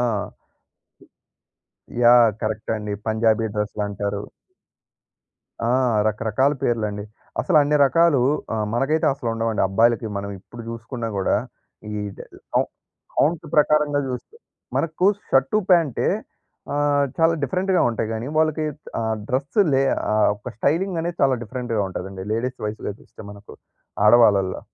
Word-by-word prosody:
ఆ! - - +2 2.0
యాహ్! 120 -1 +7
కరక్టే 110 0 -3
అండి. 105 -1 -4
పంజాబీ 110 0 +2
డ్రస్‌లంటారు. 105 -1 -3 1.4
ఆ! - - +1 0.4
రకరకాల 110 +6 +1
పేర్లండి. 105 -4 -1 0.4
అసలు 175 -5 +1
అన్ని 150 +1 +2
రకాలూ, 165 -1 +3 0.3
ఆహ్, 110 -1 -1
మనకైతే 145 +6 +1
అసలుండవండి, 115 -4 -1
అబ్బాయిలకి. 115 +3 +2
మనం 100 0 -4
ఇప్పుడు 120 +3 -11
చూసుకున్నా 115 0 -5
గూడా, 95 - +1 0.6
ఈ - - -4 0.2
ద్ - - -12
ద్ - - -15 0.2
ఆవ్ - - +1 0.5
కౌంట్ 160 +2 +2
ప్రకారంగా 150 -1 +3
జూస్తే 130 - -7 0.4
మనకు 165 +3 0 0.2
షర్టు, 135 +10 +3
ప్యాంటే. 165 -8 +3 0.7
ఆ! - - -1 0.4
చాలా 165 0 +4
డిఫరెంట్‌గా 185 +6 +1
ఉంటాయి 110 -1 -3
గానీ, 115 +4 -4
వాళ్ళకి 155 0 +1 0.3
ఆహ్, 110 -1 -1
డ్రస్సు 140 - +2
లే 135 - +3 0.3
ఆహ్, 110 -1 +4
ఒక 105 - -8
స్టైలింగనేది 170 - 0
చాలా 135 -2 +4
డిఫరెంట్‌గా 120 -1 -2
ఉంటదండి. 95 0 -6
లేడీస్ 125 +3 -2
వైస్‌గా 105 -1 -4
చూస్తే - - -16
మనకు, 100 0 -13 0.5
ఆడవాళ్ళల్లో. 105 -5 +5
120 Hz, 120 wpm, -22 LUFS, 110-145 Hz, 2.0 s, యాహ్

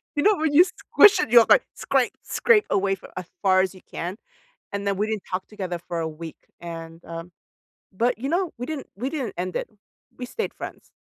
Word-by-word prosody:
you 290 - +1
know 425 0 +5
when 310 -1 0
you 325 +5 +9
squish 385 +2 +5
it, 360 - 0
you're 235 -2 +8
like, - - +7
"Scrape, - - +1
scrape 455 -3 +3
away," 195 0 +2
for 190 - -14
as 185 - -4 0.2
far 185 -1 +5
as 190 0 -2
you 185 - -14
can? 175 +3 -4 0.6
And 200 0 -3
then 200 -1 0
we 210 +2 0
didn't 220 -3 -3
talk 185 0 -2
together 185 -5 -5
for 170 - -2
a 165 - -1
week. 160 0 -8 0.3
And, 165 -1 -8
um, 165 +1 -7 0.6
but, 235 +5 +1
you 265 +4 -3
know, 350 +2 0
we 245 - -4
didn't 305 -2 -5
we 250 +6 -3
didn't 265 -10 -3
end 180 +1 -3
it. - - -2 0.5
We 250 - -5
stayed 450 - -4
friends. - - -9
200 Hz, 215 wpm, -24 LUFS, 180-280 Hz, 0.6 s, you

